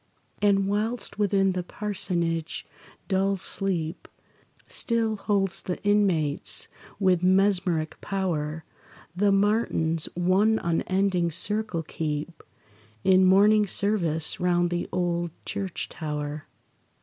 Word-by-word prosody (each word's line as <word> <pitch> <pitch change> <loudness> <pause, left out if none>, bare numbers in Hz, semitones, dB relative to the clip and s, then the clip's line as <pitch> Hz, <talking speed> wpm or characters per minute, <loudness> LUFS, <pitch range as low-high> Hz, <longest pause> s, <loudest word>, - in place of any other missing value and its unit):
And 195 -1 +3
whilst 215 +2 -2
within 195 -2 +2
the 185 0 -2
parsonage 170 -4 -2 0.4
dull 195 0 +1
sleep 185 -3 -2 0.6
Still 230 -2 -1
holds 195 -2 -1
the 180 - -4
inmates 185 -8 +1 0.3
with 185 -3 +3
mesmeric 185 -4 +1
power, 160 -5 -3 0.5
The 200 +2 +2
martins 195 -6 +1
one 190 +5 +3
unending 180 +1 0
circle 210 0 +2
keep, 155 +1 -4 0.6
In 190 0 +5
morning 205 +3 +5
service 175 -6 0
round 175 -1 +1
the 175 0 -2
old 175 -1 -1 0.2
church 195 -3 -4
tower. 150 -1 -5
185 Hz, 100 wpm, -26 LUFS, 170-200 Hz, 0.6 s, In